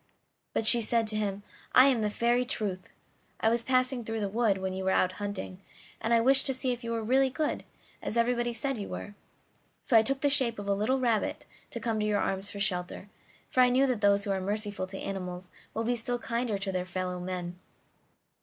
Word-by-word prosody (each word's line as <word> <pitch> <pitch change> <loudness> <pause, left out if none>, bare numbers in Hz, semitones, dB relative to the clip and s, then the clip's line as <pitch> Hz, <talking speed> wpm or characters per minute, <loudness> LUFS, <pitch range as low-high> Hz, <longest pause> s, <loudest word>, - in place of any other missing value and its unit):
But 225 - 0
she 235 +2 +9
said 230 +1 +1
to 215 - -3
him: 205 -1 -2 0.3
"I 255 - +8
am 260 -5 +3
the 210 - +1
Fairy 240 +3 +1
Truth. 205 -7 -3 0.5
I 220 - +3
was 235 +1 +2
passing 255 0 +1
through 225 0 -4
the 200 - 0
wood 215 -1 +1
when 190 0 -3
you 190 0 -4
were 190 - +1
out 185 -1 +2
hunting, 200 -2 -5 0.4
and 225 - -2
I 230 - +5
wished 270 +4 +4
to 265 - +2
find 260 0 0
out - - +1
if 245 0 -8
you 230 - -5
were 230 -1 -2
really 265 +4 +3
good, 300 +3 -2 0.4
as 225 - -2
everybody 240 0 +1
said 245 +1 -2
you 200 - -5
were, 205 - -6 0.7
so 245 - +1
I 225 - +9
took 270 +4 0
the 285 - +3
shape 255 -5 +2
of 205 -1 -6
a 200 - +2
little 215 +7 0
rabbit 235 -4 0 0.3
and - - -6
came 225 -3 -1
to 210 - 0
your 210 -1 +1
arms 195 +1 -2
for 200 - -7
shelter, 185 0 -2 0.4
for - - -2
I 250 - +6
know 260 +2 +3
that 250 -5 -1
those 200 -1 +3
who 200 - -2
are 190 -1 -1
merciful 205 -1 -3
to 195 +1 -8
animals 180 -2 -6 0.2
will 225 - -1
be 245 +2 0
still 245 +1 -2
kinder 235 -3 -2
to 195 0 -3
their 185 -1 -1
fellow 185 0 -4
men. 180 -1 -5
220 Hz, 230 wpm, -29 LUFS, 195-245 Hz, 0.7 s, she